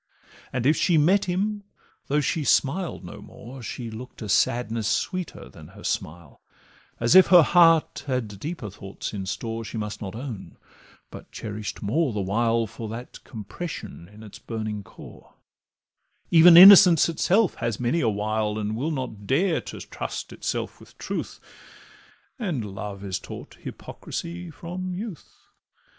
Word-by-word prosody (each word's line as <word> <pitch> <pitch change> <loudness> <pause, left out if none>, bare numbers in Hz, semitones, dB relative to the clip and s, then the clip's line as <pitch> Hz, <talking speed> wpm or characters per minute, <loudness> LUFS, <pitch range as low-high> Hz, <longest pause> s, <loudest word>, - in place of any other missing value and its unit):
And 125 -2 -2
if 150 +3 +4
she 170 +1 +2
met 185 +7 +3
him, 200 +3 -1 0.5
though 150 +2 +1
she 150 +2 -1
smiled 165 - +1
no 85 - -10
more, 125 +4 -11
She 115 0 -6
look'd 115 +1 -9
a 105 - -6
sadness 115 -1 +1
sweeter 185 -2 -2
than - - -14
her - - -15
smile, 80 -3 -5 0.6
As 120 +4 +2
if 185 0 +8
her 180 -3 +8
heart 165 -1 +4
had 115 -7 -3
deeper 145 - -6
thoughts 95 +2 -7
in 95 -2 -5
store 115 +4 -4
She 115 - -7
must 105 0 -5
not 100 -1 -6
own, 120 -5 -8 0.5
but - - -12
cherish'd 105 -2 -6
more 135 +6 0
the 105 - -2
while 115 +4 +1
For 110 +1 -8
that 115 +3 -9
compression 105 - -8
in 105 +1 -14
its 105 - -12
burning 110 -2 -5
core; - - -15 1.0
Even 170 0 +8
innocence 185 -3 +10
itself 185 +5 +2
has 115 -2 -2
many 125 +7 0
a 115 - +2
wile, 105 0 -1
And 105 0 -2
will 135 +8 -2
not 125 -9 -5
dare 165 +6 +1
to - - -9
trust - - -6
itself - - -4
with - - -18
truth, - - -5 1.0
And 165 - -2
love 100 0 -7
is 95 -2 -3
taught - - -10
hypocrisy 175 +1 -7
from 180 +3 -6
youth. 200 -4 -7
120 Hz, 150 wpm, -25 LUFS, 105-170 Hz, 1.0 s, innocence